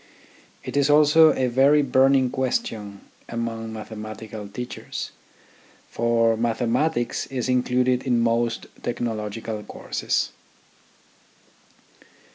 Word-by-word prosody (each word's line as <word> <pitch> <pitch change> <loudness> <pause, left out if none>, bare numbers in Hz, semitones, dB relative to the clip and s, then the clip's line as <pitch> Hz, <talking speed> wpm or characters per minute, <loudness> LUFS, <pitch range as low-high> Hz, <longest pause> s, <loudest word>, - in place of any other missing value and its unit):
It - - -6
is 140 0 +3
also 150 +2 +6
a 130 - 0
very 135 +4 +4
burning 130 -1 +3
question 110 -6 -2 0.3
among 115 -1 -4
mathematical 110 -1 -7
teachers; 120 +5 -6 0.8
for 115 -1 +2
mathematics 120 +4 0
is 130 -2 -3
included 125 0 +2
in 125 -3 +1
most 115 0 0 0.2
technological 110 -2 -3
courses. - - -2
120 Hz, 85 wpm, -24 LUFS, 115-130 Hz, 0.8 s, also